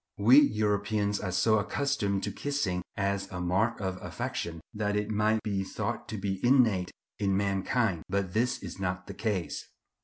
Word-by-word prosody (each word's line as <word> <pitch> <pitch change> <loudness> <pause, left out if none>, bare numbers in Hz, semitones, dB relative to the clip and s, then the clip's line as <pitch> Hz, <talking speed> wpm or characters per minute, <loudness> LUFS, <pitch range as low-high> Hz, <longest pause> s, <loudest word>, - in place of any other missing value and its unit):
We 120 +7 +8
Europeans 105 -3 +1
are 95 - -3
so 110 +4 +3
accustomed 105 -3 0
to 105 - -2
kissing 105 -8 -1 0.2
as 100 -1 -1
a 90 - -5
mark 95 +7 +1
of 95 -2 -3
affection, 85 -1 -4
that 105 -1 -1
it 105 +1 -1
might 110 +1 +2
be 100 -2 -1
thought 95 - -4
to 110 - -5
be 95 -1 -3
innate 120 -8 +4 0.3
in 100 -2 +2
mankind; 100 -1 +1
but 95 -1 -1
this 120 +3 0
is - - -7
not 90 -1 -2
the 100 - -7
case. 100 -4 -2
100 Hz, 165 wpm, -29 LUFS, 95-110 Hz, 0.3 s, We